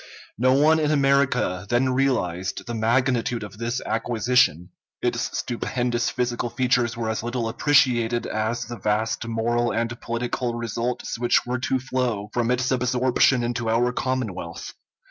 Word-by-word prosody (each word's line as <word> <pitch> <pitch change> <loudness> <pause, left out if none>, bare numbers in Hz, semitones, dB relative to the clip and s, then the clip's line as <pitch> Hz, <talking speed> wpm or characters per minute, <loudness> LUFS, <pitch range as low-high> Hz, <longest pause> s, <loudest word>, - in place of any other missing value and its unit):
No 130 +2 +4
one 155 +4 +4
in 150 -1 +1
America 140 -10 +2
then 130 +2 +2
realized 95 -9 -1
the 120 - -5
magnitude 120 +1 +1
of 105 +1 -10
this 120 +2 -2
acquisition; 110 -6 +1 0.3
its - - -1
stupendous 120 0 -1
physical 120 -1 -2
features 120 -1 +1
were 115 -1 -2
as 110 0 -1
little 120 0 -2
appreciated 120 -2 +2
as 110 +2 -2
the 120 -1 -8
vast 110 +3 -1
moral 120 +1 0
and 115 +1 -2
political 120 +1 -2
results 115 +1 -3
which 120 0 +2
were 125 0 -2
to 130 +1 0
flow 125 -5 -2
from 120 -1 0
its 125 +1 +1
absorption 125 0 +2
into 120 -1 -2
our 120 +2 +2
commonwealth. 110 -10 -4
120 Hz, 145 wpm, -24 LUFS, 115-125 Hz, 0.3 s, No